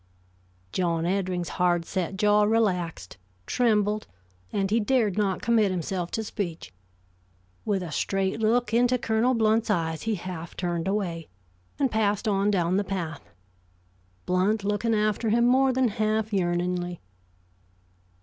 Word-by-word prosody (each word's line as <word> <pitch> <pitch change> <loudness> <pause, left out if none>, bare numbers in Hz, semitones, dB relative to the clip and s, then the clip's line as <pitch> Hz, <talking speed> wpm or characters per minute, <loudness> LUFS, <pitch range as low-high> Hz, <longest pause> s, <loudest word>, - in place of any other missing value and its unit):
John 170 - 0
Eddring's 180 -2 -1
hard 175 -1 +2
set 190 +1 -3
jaw 210 +1 +4
relaxed, 190 - 0 0.3
trembled, 210 - +1 0.4
and 195 -1 -1
he 225 - +3
dared 220 -4 +1
not 200 -3 0
commit 225 -3 +3
himself 180 0 -3
to 220 - -3
speech. 170 - -5 0.9
With 200 -3 0
a 170 - -6
straight 195 +5 -1
look 225 +1 +1
into 245 +2 +3
Colonel 230 +2 +1
Blount's 225 0 +2
eyes, 160 -5 0
he 225 -1 -1
half 175 -2 -7
turned 175 -1 -2
away, 180 -5 -2 0.5
and 270 -4 +1
passed 210 0 0
on 200 0 +2
down 180 -2 +1
the 205 - +1
path, 175 -6 -5 1.0
Blount 195 +4 +1
looking 210 +3 0
after 215 +1 0
him 235 +2 +3
more 260 +2 +4
than 255 -1 +2
half 215 0 -1
yearningly. 175 -1 -1
200 Hz, 135 wpm, -26 LUFS, 180-220 Hz, 1.0 s, jaw